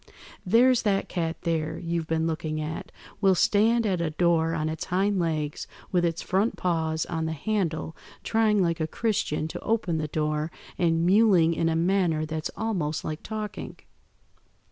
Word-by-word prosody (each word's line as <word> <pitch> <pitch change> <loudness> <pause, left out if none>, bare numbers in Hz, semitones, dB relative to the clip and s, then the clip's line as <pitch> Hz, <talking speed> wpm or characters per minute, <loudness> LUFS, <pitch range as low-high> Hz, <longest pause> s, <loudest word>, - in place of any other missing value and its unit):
There's 245 +5 +4
that 195 -2 0
cat 165 -2 -2
there, 160 -3 -1
you've 170 -1 -3
been 160 0 0
looking 160 -1 -2
at, 155 +1 -5 0.3
will 195 -2 +5
stand 225 +5 +3
at 185 -4 0
a 165 - 0
door 165 0 +2
on 155 -1 -1
its 155 0 -4
hind 195 +2 +1
legs 155 -3 -2 0.2
with 180 -2 +2
its 170 -1 -1
front 195 +5 +1
paws 160 -3 0
on 160 -2 -2
the 160 - -2
handle 165 -3 -2 0.3
trying 215 -3 +2
like 170 -1 0
a 155 - 0
Christian 160 -6 -1
to - - -6
open 210 -8 0
the 155 - -2
door, 150 0 -1 0.3
and 165 -1 +1
mewling 185 -4 +5
in 165 0 +1
a 160 - 0
manner 170 -2 +1
that's 155 0 -3
almost 180 -9 -2
like 155 0 -4
talking. 215 -1 -6
170 Hz, 165 wpm, -26 LUFS, 160-195 Hz, 0.3 s, will